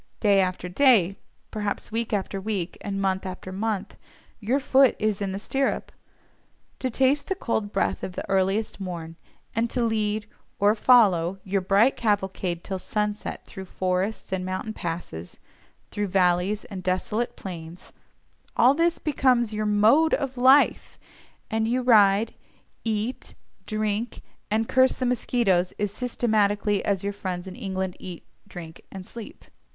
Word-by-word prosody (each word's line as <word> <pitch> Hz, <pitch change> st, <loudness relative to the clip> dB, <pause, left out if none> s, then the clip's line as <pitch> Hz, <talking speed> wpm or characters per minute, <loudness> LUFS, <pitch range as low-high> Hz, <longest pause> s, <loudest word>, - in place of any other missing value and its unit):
Day 200 Hz, -2 st, +4 dB
after 185 Hz, -1 st, -2 dB
day, 195 Hz, -2 st, +4 dB, 0.4 s
perhaps 210 Hz, -1 st, -3 dB
week 230 Hz, +1 st, -2 dB
after 195 Hz, -1 st, -2 dB
week 195 Hz, -4 st, -3 dB
and 195 Hz, -1 st, -3 dB
month 190 Hz, -1 st, 0 dB
after 185 Hz, 0 st, -7 dB
month, 205 Hz, +1 st, -3 dB, 0.4 s
your 235 Hz, +6 st, +1 dB
foot 270 Hz, -1 st, +4 dB
is 215 Hz, -1 st, -1 dB
in 195 Hz, -1 st, -1 dB
the 190 Hz, -, -3 dB
stirrup. 270 Hz, +6 st, -1 dB, 0.9 s
To 260 Hz, -, -1 dB
taste 265 Hz, +4 st, +2 dB
the 385 Hz, -, -1 dB
cold 220 Hz, -, -2 dB
breath 195 Hz, -, 0 dB
of 185 Hz, -, -4 dB
the -, -, -6 dB
earliest 195 Hz, +3 st, 0 dB
morn, 170 Hz, -4 st, -6 dB, 0.4 s
and 230 Hz, +1 st, +1 dB
to 245 Hz, 0 st, -1 dB
lead, 215 Hz, -2 st, 0 dB, 0.3 s
or 205 Hz, +1 st, +4 dB
follow, 195 Hz, -7 st, +4 dB
your 195 Hz, 0 st, 0 dB
bright 200 Hz, +7 st, +4 dB
cavalcade 190 Hz, -5 st, -1 dB
till 190 Hz, -1 st, -4 dB
sunset 210 Hz, +1 st, -3 dB
through 190 Hz, -1 st, -9 dB
forests 185 Hz, +3 st, -2 dB
and 185 Hz, -1 st, -1 dB
mountain 185 Hz, +4 st, -4 dB
passes, 165 Hz, -, -6 dB, 0.5 s
through 205 Hz, 0 st, -2 dB
valleys 180 Hz, +2 st, +1 dB
and 195 Hz, -3 st, -7 dB
desolate 185 Hz, +6 st, -1 dB
plains, 170 Hz, -2 st, -9 dB, 0.6 s
all 250 Hz, +3 st, +6 dB
this 335 Hz, +3 st, +2 dB
becomes 250 Hz, -6 st, +2 dB
your 215 Hz, 0 st, -1 dB
MODE 220 Hz, +10 st, +4 dB
OF 270 Hz, -2 st, -4 dB
LIFE, 260 Hz, +3 st, +4 dB, 0.5 s
and 220 Hz, 0 st, +1 dB
you 250 Hz, +2 st, 0 dB
ride, 210 Hz, -3 st, +5 dB, 0.5 s
eat, 220 Hz, +2 st, -3 dB, 0.3 s
drink, 215 Hz, +1 st, -2 dB, 0.3 s
and 220 Hz, +2 st, +1 dB
curse 260 Hz, 0 st, +4 dB
the 255 Hz, -, -2 dB
mosquitoes 225 Hz, -7 st, +1 dB
as 205 Hz, -1 st, -3 dB
systematically 210 Hz, -4 st, +1 dB
as 195 Hz, -2 st, 0 dB
your 200 Hz, 0 st, -2 dB
friends 185 Hz, -2 st, -4 dB
in 185 Hz, -1 st, -8 dB
England 190 Hz, -2 st, -3 dB
eat, 180 Hz, -2 st, -8 dB, 0.2 s
drink, 170 Hz, -4 st, -10 dB
and 190 Hz, -1 st, -8 dB
sleep. 230 Hz, +2 st, -10 dB
205 Hz, 145 wpm, -25 LUFS, 190-230 Hz, 0.9 s, all